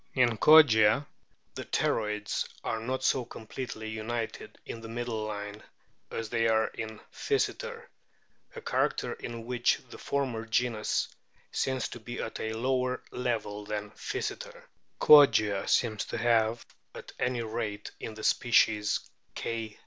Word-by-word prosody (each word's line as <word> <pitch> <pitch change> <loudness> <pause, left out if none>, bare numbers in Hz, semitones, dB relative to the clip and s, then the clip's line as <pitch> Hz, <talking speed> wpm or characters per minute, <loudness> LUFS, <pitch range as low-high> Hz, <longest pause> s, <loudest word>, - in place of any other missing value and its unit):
In 125 -3 +4
Kogia 140 -5 +7 0.5
the - - -5
pterygoids 105 -1 -1 0.2
are 115 - -1
not 130 +3 -3
so 130 -1 +2
completely 115 -1 -7
united 110 +1 -4
in 115 - -7
the 115 - -8
middle 115 -1 -3
line 105 0 -5 0.5
as 115 -1 -4
they 115 -1 +2
are 110 0 +3
in 110 -1 -7
Physeter, 465 +2 -1 0.7
a 470 - -7
character - - 0
in 115 -1 -7
which 120 0 +2
the - - -10
former 125 -5 -2
genus 115 -1 0 0.4
seems 130 -2 -1
to 120 - -8
be 120 +2 -7
at 110 - -4
a 110 - -2
lower 125 +2 0
level 110 -4 -2
than 105 0 -4
Physeter; - - -5 0.4
Kogia 110 -9 +6
seems 110 -4 +2
to - - -4
have 115 0 +2 0.3
(at - - -9
any 125 -2 0
rate 110 -2 -4
in 110 - -6
the 110 - -9
species 105 -3 +3 0.3
K. 115 -2 -4
115 Hz, 135 wpm, -29 LUFS, 110-125 Hz, 0.7 s, Kogia